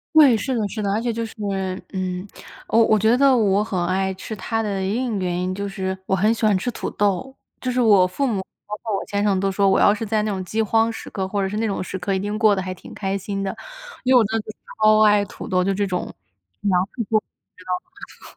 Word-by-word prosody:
对， 280 Hz, -7 st, +7 dB
是 255 Hz, +4 st, -2 dB
的 220 Hz, -, 0 dB
是 215 Hz, +2 st, -4 dB
的。 200 Hz, -, -1 dB
而 220 Hz, -, 0 dB
且 240 Hz, -, -1 dB
就 230 Hz, 0 st, -3 dB
是 225 Hz, -, -10 dB, 0.6 s
嗯， 185 Hz, -1 st, -3 dB, 0.4 s
呃， 225 Hz, -, +4 dB
我 230 Hz, -, +6 dB
我 215 Hz, -, +4 dB
觉 220 Hz, +4 st, +3 dB
得 275 Hz, -1 st, +5 dB
我 205 Hz, -3 st, +3 dB
很 190 Hz, -5 st, -1 dB
爱 190 Hz, +1 st, 0 dB
吃 200 Hz, +3 st, -7 dB
它 225 Hz, +3 st, -2 dB
的 200 Hz, -2 st, -2 dB
另 210 Hz, +7 st, -1 dB
一 200 Hz, -, -1 dB
个 185 Hz, -, -2 dB
原 175 Hz, -1 st, -1 dB
因， 185 Hz, +1 st, -1 dB
就 200 Hz, +1 st, -4 dB
是 190 Hz, -1 st, -3 dB
我 190 Hz, -, +1 dB
很 210 Hz, +5 st, +3 dB
喜 225 Hz, -, -1 dB
欢 205 Hz, -3 st, +4 dB
吃 245 Hz, +6 st, -2 dB
土 -, -, -4 dB
豆。 205 Hz, +7 st, -1 dB, 0.2 s
就 255 Hz, -, -3 dB
是 250 Hz, 0 st, +1 dB
我 200 Hz, -5 st, +5 dB
父 230 Hz, +10 st, -2 dB
母 215 Hz, -7 st, 0 dB, 0.2 s
包 210 Hz, -, -5 dB
括 220 Hz, -3 st, -2 dB
我 -, -, -2 dB
先 200 Hz, 0 st, -1 dB
生 205 Hz, -2 st, +2 dB
都 195 Hz, 0 st, +1 dB
说， 200 Hz, 0 st, +2 dB
我 -, -, +4 dB
要 205 Hz, -, +5 dB
是 220 Hz, +1 st, -4 dB
在 215 Hz, 0 st, +1 dB
那 215 Hz, -, -1 dB
种 190 Hz, -1 st, -3 dB
饥 220 Hz, +5 st, -1 dB
荒 225 Hz, +1 st, +2 dB
时 225 Hz, -, -7 dB
刻， 190 Hz, -2 st, -3 dB
或 200 Hz, +1 st, -1 dB
者 190 Hz, -, 0 dB
是 210 Hz, -, -4 dB
那 225 Hz, 0 st, 0 dB
种 195 Hz, -2 st, -2 dB
时 190 Hz, -, -5 dB
刻， 195 Hz, +2 st, -1 dB
一 190 Hz, -, 0 dB
定 205 Hz, +2 st, -3 dB
过 215 Hz, -3 st, +5 dB
得 190 Hz, -, -2 dB
还 185 Hz, 0 st, -4 dB
挺 -, -, -13 dB
开 195 Hz, -1 st, -2 dB
心 195 Hz, 0 st, -4 dB
的， 195 Hz, -, -2 dB, 0.5 s
因 260 Hz, -, +4 dB
为 -, -, +9 dB
我 230 Hz, -, +6 dB
真 220 Hz, +2 st, -1 dB
的 210 Hz, -, -8 dB, 0.4 s
超 215 Hz, 0 st, +6 dB
爱 205 Hz, -1 st, +4 dB
土 225 Hz, -, -9 dB
豆 185 Hz, -1 st, +2 dB
就 195 Hz, +2 st, +1 dB
这 205 Hz, +1 st, 0 dB
种， 180 Hz, -2 st, -3 dB, 0.5 s
粮 185 Hz, -3 st, +2 dB
食 235 Hz, -, -1 dB
作 220 Hz, -, +4 dB
物 -, -, -27 dB, 0.9 s
你 -, -, -27 dB
知 -, -, -14 dB
道 -, -, -12 dB
吗？ -, -, -25 dB
205 Hz, 305 characters per minute, -22 LUFS, 190-225 Hz, 0.9 s, 为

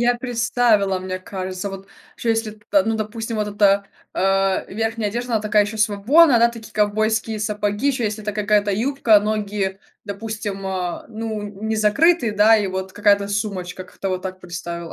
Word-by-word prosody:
Я 240 Hz, 0 st, +3 dB
представила, 230 Hz, -5 st, +1 dB
мне 185 Hz, 0 st, -4 dB
кажется. 185 Hz, 0 st, -5 dB
Вот 195 Hz, 0 st, -9 dB, 0.3 s
чё 235 Hz, -, -4 dB
если 225 Hz, -1 st, 0 dB
п 205 Hz, -2 st, +1 dB
ну, 225 Hz, 0 st, 0 dB
допустим, 220 Hz, +1 st, -4 dB
вот 210 Hz, -1 st, -1 dB
эта, 200 Hz, -1 st, +3 dB, 0.3 s
а, 195 Hz, 0 st, +1 dB
верхняя 225 Hz, +1 st, -2 dB
одежда, 240 Hz, +2 st, -4 dB
она 220 Hz, -, +2 dB
такая 210 Hz, -1 st, +3 dB
еще 215 Hz, +2 st, -6 dB
свободная, 230 Hz, +7 st, +4 dB
да, 235 Hz, +1 st, +5 dB
такие 230 Hz, -2 st, -11 dB
ковбойские 215 Hz, +1 st, 0 dB
сапоги, 210 Hz, +4 st, -1 dB
еще 250 Hz, -4 st, 0 dB
если 215 Hz, 0 st, -3 dB
это 210 Hz, -, -2 dB
какая-то 205 Hz, 0 st, +1 dB
юбка, 230 Hz, 0 st, +3 dB
ноги, 205 Hz, -2 st, -2 dB, 0.2 s
допустим, 205 Hz, -1 st, -5 dB
а, 185 Hz, -2 st, -3 dB
ну 220 Hz, -1 st, -4 dB
н 205 Hz, +1 st, -7 dB
не 220 Hz, -, 0 dB
закрытые, 240 Hz, +5 st, +3 dB
да, 210 Hz, +2 st, +5 dB
и 205 Hz, -2 st, 0 dB
вот 190 Hz, 0 st, -4 dB
какая-то 200 Hz, -1 st, +3 dB
сумочка. 200 Hz, -3 st, -3 dB
Как-то 195 Hz, +1 st, -6 dB
вот 185 Hz, 0 st, -2 dB
так 185 Hz, -1 st, -5 dB
представила. 170 Hz, -1 st, -7 dB
210 Hz, 175 wpm, -21 LUFS, 195-225 Hz, 0.3 s, да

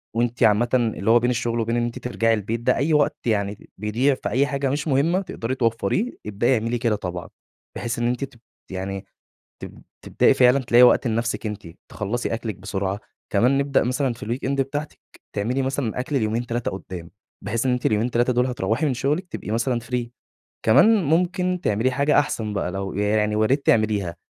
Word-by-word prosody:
وأنتِ 120 Hz, +1 st, 0 dB
عامةً 110 Hz, +3 st, +4 dB
اللي 115 Hz, -4 st, +1 dB
هو 120 Hz, -, +6 dB
بين 120 Hz, +1 st, +1 dB
الشغل 120 Hz, -1 st, -1 dB
وبين 115 Hz, +1 st, 0 dB
إن 120 Hz, -, +1 dB
أنتِ 120 Hz, 0 st, -4 dB
ترجعي 115 Hz, -2 st, +1 dB
البيت 110 Hz, +2 st, -2 dB
ده، 120 Hz, -, +2 dB
أي 155 Hz, +3 st, +1 dB
وقت 150 Hz, -1 st, +2 dB
يعني 100 Hz, -2 st, -1 dB
بيضيع 115 Hz, +7 st, +1 dB
في -, -, -4 dB
أي 140 Hz, +3 st, +2 dB
حاجة 140 Hz, 0 st, -1 dB
مش 145 Hz, +4 st, -2 dB
مهمة 155 Hz, +7 st, +2 dB
تقدري 130 Hz, -9 st, -4 dB
توفريه، 115 Hz, -, 0 dB
ابدأي 105 Hz, +5 st, +1 dB
اعملي 115 Hz, +2 st, -1 dB
كده 115 Hz, -2 st, +1 dB
طبعًا، 90 Hz, -3 st, -6 dB, 0.5 s
بحيث 120 Hz, 0 st, -3 dB
إن 120 Hz, -, +1 dB
أنتِ 125 Hz, +3 st, -1 dB
ت 120 Hz, -3 st, -8 dB, 0.3 s
يعني 95 Hz, +1 st, -4 dB, 0.6 s
تب -, -, -9 dB, 0.2 s
تبدئي -, -, +3 dB
فعلًا 125 Hz, +1 st, +5 dB
تلاقي 120 Hz, -1 st, +5 dB
وقت 125 Hz, +1 st, +5 dB
لنفسِك 115 Hz, +1 st, -1 dB
أنتِ، 105 Hz, -4 st, -5 dB, 0.2 s
تخلّصي 115 Hz, +3 st, -3 dB
أكلِك 115 Hz, -2 st, -4 dB
بسرعة، 95 Hz, +1 st, -3 dB, 0.3 s
كمان 125 Hz, +7 st, +3 dB
نبدأ 140 Hz, 0 st, +2 dB
مثلًا 130 Hz, +1 st, 0 dB
في 115 Hz, -, -9 dB
الweekend 125 Hz, +4 st, -2 dB
بتاعتِك، 145 Hz, +3 st, -4 dB, 0.3 s
تعملي 120 Hz, +6 st, -1 dB
مثلًا 130 Hz, -3 st, -2 dB
أكل 135 Hz, +2 st, -1 dB
ليومين، 115 Hz, +2 st, -1 dB
3 120 Hz, 0 st, -2 dB
قدّام، 90 Hz, -3 st, -8 dB, 0.3 s
بحيث 115 Hz, +5 st, -2 dB
إن 130 Hz, -, +3 dB
أنتِ 125 Hz, 0 st, -2 dB
اليومين 110 Hz, +3 st, +1 dB
3 120 Hz, +2 st, +2 dB
دول 125 Hz, +1 st, +2 dB
هتروّحي 125 Hz, +2 st, -1 dB
من 140 Hz, -, +1 dB
شغلِك 150 Hz, +9 st, -1 dB
تبقي 105 Hz, -, -6 dB
مثلًا 120 Hz, +2 st, 0 dB
free، 120 Hz, 0 st, -3 dB, 0.6 s
كمان 210 Hz, -, +5 dB
ممكن 180 Hz, +3 st, +1 dB
تعملي 110 Hz, +5 st, +1 dB
حاجة 140 Hz, +3 st, +2 dB
أحسن 115 Hz, -7 st, 0 dB
بقى، 100 Hz, -3 st, -2 dB
لو 95 Hz, +1 st, -4 dB
يعني 105 Hz, +1 st, +1 dB
ويا 110 Hz, -, +3 dB
ريت 135 Hz, +4 st, 0 dB
تعمليها، 105 Hz, -6 st, +2 dB
120 Hz, 190 wpm, -23 LUFS, 105-135 Hz, 0.6 s, هو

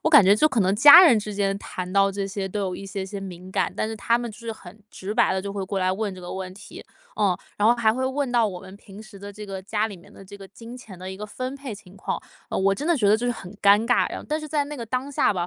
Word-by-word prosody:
我 -, -, +3 dB
感 -, -, +9 dB
觉 200 Hz, +2 st, +6 dB
就 305 Hz, +8 st, +3 dB
可 235 Hz, -, 0 dB
能 190 Hz, +1 st, +2 dB
家 290 Hz, -, +10 dB
人 245 Hz, -10 st, +6 dB
之 210 Hz, 0 st, -5 dB
间 195 Hz, -1 st, 0 dB
谈 185 Hz, -2 st, -6 dB
到 195 Hz, 0 st, +4 dB
这 195 Hz, 0 st, -3 dB
些 195 Hz, -1 st, -4 dB
都 205 Hz, +2 st, -3 dB
有 185 Hz, -2 st, -2 dB
一 195 Hz, -, -9 dB
些 195 Hz, 0 st, -4 dB
些 200 Hz, +1 st, -6 dB
敏 185 Hz, -1 st, -9 dB
感， -, -, 0 dB
但 215 Hz, -, -1 dB
是 225 Hz, -, -4 dB
他 235 Hz, +3 st, +1 dB
们 240 Hz, -1 st, -5 dB
就 215 Hz, -, -13 dB
是 230 Hz, -1 st, -5 dB
很 210 Hz, -1 st, -14 dB
直 195 Hz, +2 st, -6 dB
白 -, -, +3 dB
地 190 Hz, -, -1 dB
就 200 Hz, -, -5 dB
会 200 Hz, -1 st, -3 dB
过 195 Hz, +1 st, -3 dB
来 185 Hz, 0 st, +2 dB
问 205 Hz, 0 st, -3 dB
这 185 Hz, -, -11 dB
个 175 Hz, -, -7 dB
问 190 Hz, -1 st, -6 dB
题。 200 Hz, -, -12 dB, 0.3 s
哦， 195 Hz, -3 st, +1 dB, 0.2 s
然 210 Hz, +2 st, +4 dB
后 240 Hz, -, +6 dB
还 220 Hz, -2 st, +2 dB
会 260 Hz, +2 st, -2 dB
问 270 Hz, 0 st, -2 dB
到 235 Hz, -2 st, +3 dB
我 180 Hz, -3 st, -6 dB
们 190 Hz, -, -12 dB
平 200 Hz, +1 st, -13 dB
时 215 Hz, -2 st, -14 dB
的 200 Hz, +1 st, -9 dB
这 210 Hz, +1 st, -9 dB
个 195 Hz, -2 st, -6 dB
家 210 Hz, +2 st, -1 dB
里 200 Hz, -, -9 dB
面 195 Hz, +4 st, -18 dB
的 195 Hz, -, -14 dB
这 200 Hz, +2 st, -11 dB
个 195 Hz, -, -10 dB
金 230 Hz, +4 st, -11 dB
钱 190 Hz, -7 st, -12 dB
的 185 Hz, +1 st, -7 dB
一 190 Hz, -, -7 dB
个 210 Hz, +2 st, -7 dB
分 255 Hz, +5 st, -5 dB
配 270 Hz, -6 st, -7 dB
情 195 Hz, -3 st, -15 dB
况， -, -, -4 dB, 0.3 s
呃， -, -, -3 dB
我 195 Hz, +1 st, +2 dB
真 290 Hz, -, -5 dB
的 340 Hz, -2 st, +3 dB
觉 210 Hz, -5 st, +2 dB
得 210 Hz, -, +5 dB
就 245 Hz, +2 st, -3 dB
是 245 Hz, -, +1 dB
很 190 Hz, -5 st, -10 dB
尴 205 Hz, +2 st, +5 dB
尬， 245 Hz, -, +3 dB
然 -, -, -5 dB
后 -, -, -10 dB
但 305 Hz, +1 st, 0 dB
是 305 Hz, -, -8 dB
在 295 Hz, -1 st, 0 dB
那 290 Hz, +1 st, -7 dB
个 235 Hz, -, -6 dB
当 255 Hz, +4 st, -3 dB
下 270 Hz, -, +2 dB
吧， 175 Hz, -2 st, -2 dB
205 Hz, 350 characters per minute, -24 LUFS, 195-235 Hz, 0.3 s, 家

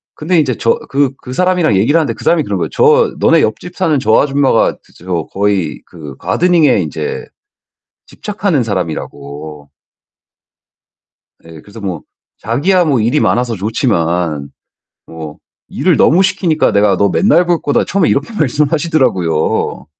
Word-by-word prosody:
근데 165 Hz, +2 st, 0 dB
인제 130 Hz, -6 st, 0 dB
저 115 Hz, -, +1 dB
그 140 Hz, -1 st, +1 dB
그 125 Hz, -, -9 dB
사람이랑 180 Hz, -, +1 dB
얘기를 115 Hz, +12 st, +3 dB
하는데 145 Hz, -8 st, -1 dB
그 -, -, -12 dB
사람이 165 Hz, -2 st, +2 dB
그러는 -, -, -3 dB
거예요. -, -, -2 dB
저 460 Hz, 0 st, +3 dB
"너네 -, -, +4 dB
옆집 180 Hz, 0 st, -3 dB
사는 165 Hz, -6 st, +1 dB
저 110 Hz, -3 st, +3 dB
아줌마가 140 Hz, -4 st, +1 dB
그 -, -, -25 dB
저 85 Hz, -2 st, -4 dB
거의 100 Hz, -3 st, -1 dB
그 75 Hz, -6 st, -11 dB
가드닝에 165 Hz, -, +2 dB
인제 450 Hz, 0 st, -4 dB, 0.8 s
집착하는 200 Hz, -, -2 dB
사람."이라고. 75 Hz, -6 st, -6 dB, 1.8 s
예 80 Hz, -2 st, -12 dB
그래서 105 Hz, +5 st, -13 dB
뭐 90 Hz, -5 st, -4 dB, 0.4 s
자기야 170 Hz, -, +1 dB
뭐 140 Hz, -5 st, +1 dB
일이 120 Hz, +7 st, +1 dB
많아서 120 Hz, -1 st, 0 dB
좋지만 85 Hz, -, -1 dB, 0.6 s
뭐 80 Hz, -2 st, -9 dB, 0.3 s
일을 -, -, +1 dB
너무 180 Hz, +5 st, +4 dB
시키니까 170 Hz, -4 st, +1 dB
"내가 100 Hz, -1 st, +3 dB
너 100 Hz, +2 st, +2 dB
맨날 180 Hz, -3 st, +3 dB
볼 175 Hz, -1 st, +1 dB
거다." 145 Hz, -, +1 dB
처음에 190 Hz, -3 st, 0 dB
이렇게 145 Hz, +12 st, -1 dB
말씀하시더라고요. 140 Hz, -, 0 dB
125 Hz, 320 characters per minute, -14 LUFS, -, 1.8 s, 너네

